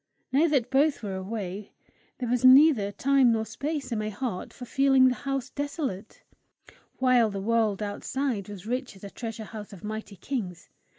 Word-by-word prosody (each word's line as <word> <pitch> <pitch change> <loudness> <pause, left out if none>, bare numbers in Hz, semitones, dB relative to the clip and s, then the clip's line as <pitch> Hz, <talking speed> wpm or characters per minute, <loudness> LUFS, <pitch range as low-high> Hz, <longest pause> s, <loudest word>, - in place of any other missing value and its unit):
Now 290 +6 +4
that 265 -5 +1
both 280 -1 +2
were 200 -2 -3
away, 195 0 -5 0.4
there 250 - -3
was 245 +1 0
neither 255 -5 +7
time 265 +3 +3
nor 220 -1 0
space 280 +6 -4
in 225 - -1
my 215 0 -2
heart 215 -3 -4
for 250 - -9
feeling 270 0 +4
the - - 0
house 270 -1 -4
desolate; 285 - -5 0.7
while 250 -3 +4
the 200 -1 -4
world 215 -1 +1
outside 210 +1 -3
was 200 -2 -9
rich 250 0 -3
as 195 - -17
a 200 - -8
treasure 225 -2 -6
house 210 -1 -9
of 185 - -12
mighty 215 -1 -6
kings. 190 -5 -5
230 Hz, 175 wpm, -27 LUFS, 205-270 Hz, 0.7 s, neither